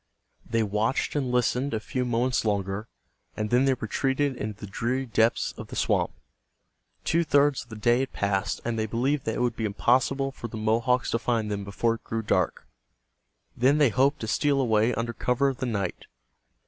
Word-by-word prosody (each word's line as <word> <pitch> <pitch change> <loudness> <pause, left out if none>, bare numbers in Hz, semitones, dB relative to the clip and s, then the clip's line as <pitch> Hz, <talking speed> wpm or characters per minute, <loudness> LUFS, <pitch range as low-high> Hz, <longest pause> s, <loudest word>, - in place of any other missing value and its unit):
They 115 -1 +2
watched 105 +8 0
and 135 -4 0
listened 125 +2 +1
a - - -1
few 125 +3 -3
moments 125 +1 +1
longer, 100 0 -1 0.5
and 105 -1 -2
then 125 +2 +4
they 135 -1 +3
retreated 135 +4 -1
into 105 -3 -5
the - - -6
dreary 120 +6 -2
depths 115 -1 +1
of - - -7
the - - -8
swamp. - - +1 0.9
Two 170 +1 +2
thirds 145 -2 +3
of 120 - -14
the 110 - -8
day 120 +3 +2
had 135 0 -2
passed, 100 0 -1
and 115 -1 -1
they 110 - 0
believed 130 +6 0
that 110 - -1
it - - -2
would 120 -2 +1
be 115 - -4
impossible 130 +6 +1
for 120 - -7
the 110 - -7
Mohawks 115 +4 +1
to 115 - +1
find 115 -3 -1
them 100 -1 -2
before 100 +4 0
it 115 - -9
grew 110 0 -3
dark. - - 0 0.9
Then 130 +5 +3
they 145 -4 +5
hoped 135 +5 +2
to 110 - -3
steal 140 +5 +2
away 115 -2 +3
under 115 0 -2
cover 125 +4 +1
of 135 - -4
the 130 - -2
night. 100 -6 -3
120 Hz, 200 wpm, -26 LUFS, 110-130 Hz, 0.9 s, they